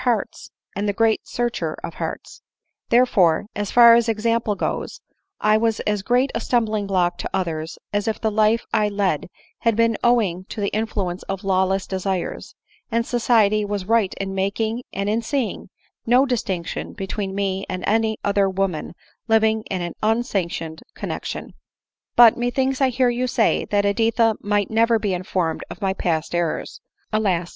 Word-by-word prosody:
hearts, 240 -5 -1 0.3
and 205 +1 -1
the - - 0
great 225 -1 +2
Searcher 240 -1 -2
of - - -5
hearts; - - -6 0.5
therefore, 210 -9 +4
as 205 -1 -2
far 235 -1 +8
as 235 0 +3
example 225 -1 0
goes, 480 - -3 0.4
I 215 0 +4
was 225 0 +1
as 210 -1 -1
great 250 +6 +1
a 230 - -1
stumbling 220 -4 0
block 180 -3 +1
to - - -4
others 165 -3 -3 0.2
as 205 +1 0
if 220 - -1
the 220 - 0
life 215 +2 +2
I 210 - +3
led 200 -6 -1 0.3
had 230 -2 +1
been 230 -1 +2
owing 205 -7 +2
to 215 - -8
the 200 -1 0
influence 200 -5 -2
of 195 0 -3
lawless 190 0 +1
desires; 190 -1 -3 0.4
and 230 0 +1
society 225 -4 +2
was 205 -2 -3
right 220 -2 +2
in 195 0 -4
making, 215 +5 -1
and 195 +1 -3
in 220 +3 +1
seeing, 255 0 -3 0.4
no 250 +3 +5
distinction 195 -9 -3
between 195 -1 -4
me 195 -1 -1
and 185 0 -4
any 220 0 +1
other 200 -1 +2
woman 185 -4 -2 0.3
living 220 -1 +3
in 185 -2 -2
an 175 - -4
unsanctioned 190 -8 -1
connexion. - - -5 0.6
"But 235 -2 +8
methinks 260 +3 0
I 265 - +4
hear 250 0 +2
you 245 +1 -1
say, 230 -2 +1
that 205 -1 +1
Editha 225 +2 +2
might 205 0 0
never 230 +1 +3
be 210 -3 -1
informed 180 -2 -2
of - - -9
my 195 -2 0
past 165 -4 -2
errors. 170 -2 -2 0.3
Alas 185 -5 +1
210 Hz, 165 wpm, -22 LUFS, 190-230 Hz, 0.6 s, far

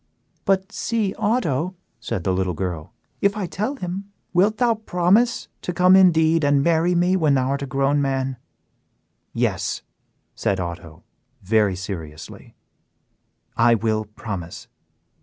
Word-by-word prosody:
"But 190 +1 +1
see, 215 -4 -1
Otto," 190 - 0 0.2
said 95 -5 -4
the 95 - +1
little 90 -2 -1
girl, 85 -3 -4 0.3
"if 200 +1 +2
I 205 - -2
tell 215 +10 -3
him, 185 -3 -5 0.3
wilt 200 +5 +3
thou 240 -2 +3
promise 215 +2 +1
to 180 - -4
come 180 +1 +5
indeed 165 -4 +5
and 145 -1 +3
marry 170 +2 +2
me 180 +2 +3
when 155 -6 +3
thou 130 0 +1
art 140 0 -2
grown 140 +2 +1
a - - +2
man?" 135 -1 -1 0.9
"Yes," - - -1 0.5
said 95 -1 -1
Otto, 85 -2 -7 0.4
very 105 -1 +2
seriously, 85 -5 -8 1.0
"I 115 0 +5
will 110 -1 -1
promise." 95 -4 -7
145 Hz, 135 wpm, -22 LUFS, -, 1.0 s, come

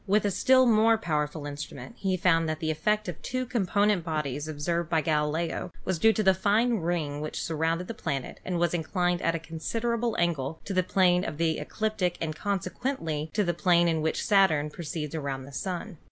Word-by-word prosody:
With 210 +2 +3
a 205 - +2
still 260 +6 +5
more 225 -1 +5
powerful 150 -5 -2
instrument 145 +9 -7
he 190 -2 0
found 165 -2 +3
that 155 0 -2
the 160 -1 0
effect 210 +7 0
of 175 - -6
two 255 0 -2
component 205 -4 +1
bodies 150 -3 -3
observed 155 +2 -2
by 160 -2 +2
Gali 150 0 +1
leo 170 +2 -3
was 185 -3 -1
due 225 +6 +6
to 215 - 0
the 190 -1 +6
fine 215 +5 +2
ring 160 -4 -2
which 155 - -4
surrounded 165 +2 -1
the - - -4
planet 145 - -4
and 180 -1 -2
was 175 0 +1
inclined 175 +1 0
at 165 - +1
a - - -2
considerable 230 +9 -2
angle 160 -3 -1
to 200 - -3
the 185 - +3
plane 180 -1 +3
of 155 -5 -4
the 165 -1 +1
ecliptic 215 -5 -1
and 155 -2 -3
consequently 185 - -2
to 210 - +3
the 175 -2 0
plane 175 0 +3
in 160 -2 +1
which 160 +1 -1
Saturn 160 -8 +3
proceeds 155 -2 -5
around 140 -4 -3
the 140 - -11
Sun. 175 - -4
170 Hz, 200 wpm, -28 LUFS, 155-200 Hz, -, due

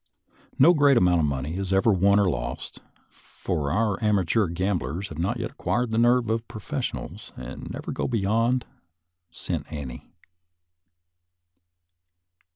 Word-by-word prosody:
No 165 +7 +7
great 145 -4 +5
amount 90 -4 +4
of 75 - +2
money 70 +5 -3
is 95 -1 -3
ever 95 +3 +4
won 100 +2 +4
or 100 - +3
lost, - - -4 0.3
for 70 -2 -4
our 105 +3 0
amateur 105 0 +2
gamblers 90 -1 -2
have 80 - -8
not 100 +8 0
yet 115 +1 -4
acquired 125 -3 -1
the 110 - +1
nerve 120 -1 +3
of 115 +1 -2
professionals, 110 -4 -5
and - - -8
never - - -6
go - - -2
beyond 115 +2 +1 0.4
" 85 +1 -56
cent 85 - -5
ante." 70 -6 -7
100 Hz, 140 wpm, -25 LUFS, 85-115 Hz, 0.4 s, No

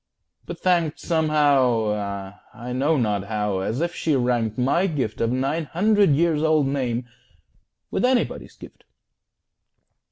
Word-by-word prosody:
but - - -7
thanked 170 -4 +1
Somehow 120 - +1 0.2
I 125 +1 -6
know 145 +5 +1
not 105 -5 0
how 105 -2 -2
as 110 +8 -2
if 175 0 -1
she 155 -3 0
ranked 120 -4 0
My 140 +9 +2
gift 130 - -3
of 115 0 +1
a - - 0
nine 140 +5 -1
hundred 205 +5 +2
years 160 -1 +1
old 155 -2 +3
name 125 -3 -2 0.8
With - - -1
anybody's 250 -1 0
gift. - - -14
135 Hz, 135 wpm, -23 LUFS, 115-160 Hz, 0.8 s, old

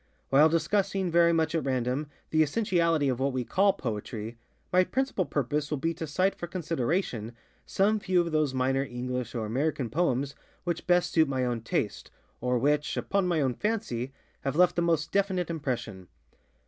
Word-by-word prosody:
While 145 +4 +6
discussing, 190 +3 0
very 170 0 +5
much 160 -1 +1
at 165 - 0
random, 130 +2 -1 0.2
the 155 - +4
essentiality 165 -3 +2
of 130 -2 0
what 135 0 0
we 130 -1 -1
call 200 - +3
Poetry, 115 - -5 0.4
my 185 0 +6
principal 260 -4 -1
purpose 145 +2 -1
will 150 - -1
be 165 +5 -1
to 165 0 -5
cite 185 +6 +1
for 175 - -6
consideration, 160 - -2 0.3
some 210 +3 +2
few 185 -2 +1
of 170 -1 -3
those 155 -3 +2
minor 130 +1 +1
English 125 -2 -4
or 115 -2 -2
American 130 +1 -1
poems 140 -3 0 0.3
which 175 -1 -3
best 175 0 +3
suit 160 -2 +4
my 130 -2 0
own 120 -2 -1
taste, 110 - -2 0.3
or 125 0 +1
which, 145 +4 +1
upon 195 -2 0
my 170 -3 +1
own 130 -3 +1
fancy, 135 - -2 0.3
have 135 - -3
left 180 +1 +4
the 175 - +1
most 165 -2 +1
definite 190 -3 0
impression. 125 - -4
150 Hz, 175 wpm, -28 LUFS, 130-175 Hz, 0.4 s, While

